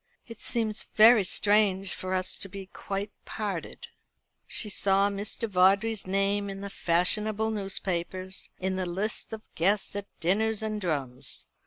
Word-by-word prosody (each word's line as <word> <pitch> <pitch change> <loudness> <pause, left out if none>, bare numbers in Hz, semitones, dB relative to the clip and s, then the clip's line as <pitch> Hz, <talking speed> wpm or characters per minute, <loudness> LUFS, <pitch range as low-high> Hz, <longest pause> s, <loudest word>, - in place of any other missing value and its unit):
"It 230 -2 -11
seems 220 -3 -1
very 220 0 +8
strange 195 0 +2
for 185 0 -3
us 185 0 -1
to 195 - -4
be 195 0 -8
quite 195 +2 -5
parted." 200 -6 -5 0.6
She 220 - -1
saw 200 0 +2
Mr. 205 +3 -3
Vawdrey's 195 +2 +3
name 200 +1 0
in 195 0 -6
the 200 0 -6
fashionable 210 +6 +2
newspapers, 190 -2 -2
in 190 0 -2
the 185 -1 -2
lists 195 +5 -2
of 220 -1 -7
guests 195 +4 +1
at 205 0 -4
dinners 215 +5 +1
and 215 -1 -3
drums. 140 -8 -1
195 Hz, 145 wpm, -28 LUFS, 185-215 Hz, 0.6 s, very